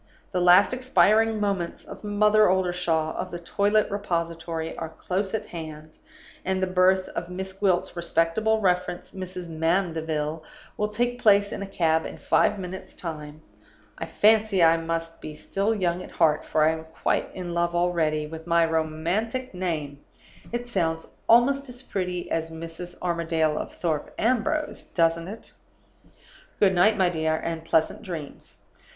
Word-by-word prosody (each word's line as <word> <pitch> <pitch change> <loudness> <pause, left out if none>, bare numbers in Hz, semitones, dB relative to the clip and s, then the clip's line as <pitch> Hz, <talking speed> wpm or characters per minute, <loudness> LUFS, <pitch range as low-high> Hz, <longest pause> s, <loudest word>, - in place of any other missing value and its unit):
The 180 - 0
last 180 +6 +6
expiring 225 -3 +3
moments 195 -4 -2
of 200 - -11
Mother 210 0 +4
Oldershaw, 175 -4 0
of 185 - -4
the 175 - -5
Toilet 205 +5 +1
Repository, 170 -4 -3
are 160 - -5
close 190 +5 -2
at 220 - -3
hand, 155 -2 -8 0.5
and 190 0 0
the 185 - +1
birth 185 0 +3
of 175 - -5
Miss 190 +1 -5
Gwilt's 190 -2 0
respectable 170 +6 +1
reference, 180 -2 0
Mrs. 185 -2 -6
Mandeville, 160 -2 -1 0.3
will 210 - 0
take 245 +3 -2
place 205 -1 +5
in - - -5
a 200 - -4
cab 160 -4 +1
in - - -9
five - - +2
minutes' 190 0 -7
time. 155 -2 -7 0.5
I - - -6
fancy 215 -3 +4
I 165 0 +6
must 165 0 -4
be 155 - -7
still 200 +7 -1
young 180 -3 0
at - - -9
heart, 155 -2 +2
for 155 - +2
I 155 - +5
am 160 0 -5
quite 160 0 -1
in 180 -2 -5
love 170 0 0
already 165 -3 +1
with 160 +2 -9
my 170 -1 +4
romantic 170 +11 -1
name; 155 -6 -3 0.5
it 240 +1 -3
sounds 165 -7 -2 0.2
almost 270 +4 +4
as 250 +1 -7
pretty 180 -6 -3
as 165 0 -1
Mrs. 165 +2 -8
Armadale 165 -3 0
of - - -4
Thorpe 160 -4 -3
Ambrose, 255 +6 0
doesn't 165 0 +1
it? 215 +4 -9 1.1
"Good 195 -2 +4
night, 205 +4 +4
my 185 -3 +3
dear, 160 -2 0
and 165 -1 -3
pleasant 160 +3 +1
dreams. 165 -9 -8
175 Hz, 155 wpm, -25 LUFS, 165-200 Hz, 1.1 s, last